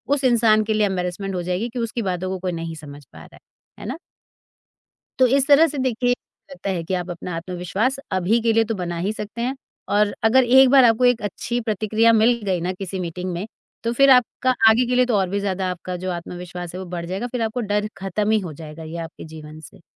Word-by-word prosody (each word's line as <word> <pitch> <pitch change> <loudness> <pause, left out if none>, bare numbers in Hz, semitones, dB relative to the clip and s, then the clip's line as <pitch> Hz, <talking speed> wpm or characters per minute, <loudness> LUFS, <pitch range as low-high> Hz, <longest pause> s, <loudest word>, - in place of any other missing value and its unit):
उस 285 - -5
इंसान 225 -4 +4
के 220 +1 -1
लिए 215 -1 +2
एम्बैरसमेंट 190 0 -3
हो 180 - -2
जाएगी 180 +6 -2
कि 245 +1 -6
उसकी 230 0 -2
बातों 180 +1 -3
को 190 0 -3
कोई 180 0 -2
नहीं 165 -1 -5
समझ 145 -2 -11
पा - - -18
रहा - - -14
है। - - -17 0.4
है - - -9
ना? - - -4 1.2
तो 260 - +7
इस 275 +2 +2
तरह 295 +3 +7
से 290 - -6
देखिए, 245 -1 +1 0.4
लगता 270 -7 -6
है 180 -3 -2
कि 175 - -4
आप 180 -1 -2
अपना 175 0 -6
आत्मविश्वास 180 +9 -2
अभी 190 +5 +2
के 225 0 +2
लिए 225 0 +4
तो - - -1
बना 175 -2 -4
ही 195 +5 -1
सकते 215 +2 -6
हैं 255 +3 -1 0.4
और 210 0 +3
अगर 250 +4 +5
एक 260 +2 +6
बार 270 0 +7
आपको 235 +1 +4
एक 245 -2 +3
अच्छी 220 +4 -3
प्रतिक्रिया 220 +1 +2
मिल 230 +2 +4
गई 185 -3 0
ना 180 +2 -1
किसी 190 0 -6
मीटिंग 180 +1 -4
में, 175 +4 -4 0.4
तो 230 0 0
फिर 275 +3 +5
आपका 255 0 +4 0.2
आगे 235 +3 +4
के 250 - 0
लिए 250 0 +4
तो 245 -3 0
और 190 -2 0
भी 200 +2 -1
ज़्यादा 190 -2 -2
आपका 180 +1 -6
जो 185 - -1
आत्मविश्वास 175 0 -7
है, - - -5
वो 190 - -6
बढ़ 170 -1 -4
जाएगा। 190 +7 -3
फिर 245 0 -4
आपको 225 +2 -1
डर 210 0 +1
ख़त्म 195 +2 -2
ही 220 - +3
हो 175 -6 -6
जाएगा 155 +1 -10
ये 160 +2 -7
आपके 165 -1 -7
जीवन 155 -1 -11
से। 155 - -14
200 Hz, 240 wpm, -22 LUFS, 180-235 Hz, 1.2 s, तो